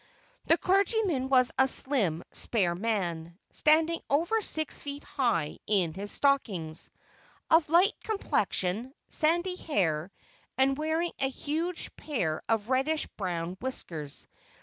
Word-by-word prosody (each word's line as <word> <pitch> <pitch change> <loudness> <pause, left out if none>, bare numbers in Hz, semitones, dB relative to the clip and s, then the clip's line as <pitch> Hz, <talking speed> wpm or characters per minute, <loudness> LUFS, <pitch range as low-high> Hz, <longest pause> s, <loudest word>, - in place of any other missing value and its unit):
The 330 - +5
clergyman 385 - +1
was 255 -2 +5
a 265 - +6
slim, 230 - +3
spare 190 -7 +1
man, 175 -5 -2
standing 320 +2 +3
over 340 +10 +1
six 315 -6 -1
feet 285 0 -6
high 200 - -1
in 185 -6 +2
his 200 +3 -2
stockings; 195 - 0 0.6
of 320 -2 +5
light 360 +6 +5
complexion, 250 - -1
sandy 345 +4 +1
hair, 180 - -1 0.5
and 270 +1 +3
wearing 315 +3 -1
a 270 - +2
huge 320 +6 -4
pair 175 - -2
of 225 +1 0
reddish 295 +4 +1
brown 180 -2 -3
whiskers. 160 - -4
265 Hz, 120 wpm, -29 LUFS, -, 0.6 s, a